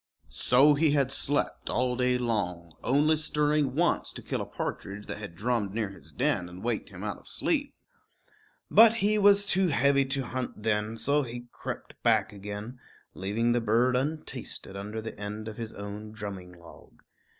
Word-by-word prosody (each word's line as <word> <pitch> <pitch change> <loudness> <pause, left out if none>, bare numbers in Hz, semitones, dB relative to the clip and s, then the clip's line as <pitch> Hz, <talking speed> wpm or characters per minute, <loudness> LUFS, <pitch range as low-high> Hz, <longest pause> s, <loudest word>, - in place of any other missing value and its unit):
So 135 +4 +5
he 150 0 +3
had 140 -3 +2
slept 145 +1 -1
all 125 0 +1
day 125 0 +2
long, 90 -8 -2
only 150 +4 +4
stirring 150 -3 +1
once 175 +3 +1
to - - -9
kill - - -2
a - - -5
partridge 100 +1 -5
that - - -5
had 105 -5 -8
drummed 105 0 -1
near 110 -3 -1
his 95 - -14
den 120 -10 0
and 90 +1 -10
waked 115 -2 -2
him 95 0 -9
out 100 -3 -3
of - - -19
sleep. - - -1 1.0
But 225 +2 +8
he 215 -1 +2
was 200 0 +6
too 190 -1 +4
heavy 140 -2 +3
to 135 0 -1
hunt 125 -3 -5
then, 105 0 0
so 140 +6 +2
he 120 -2 -6
crept - - -7
back 110 - +2
again, 105 +5 -7 0.3
leaving 105 +5 0
the 120 0 +2
bird 115 +3 +3
untasted 140 -7 -3
under 105 +3 -5
the 110 - -6
end 105 +1 -5
of 110 - -7
his 115 -1 -4
own 105 +1 -7
drumming 100 -4 -7
log. 85 -1 -16
120 Hz, 175 wpm, -28 LUFS, 105-140 Hz, 1.0 s, But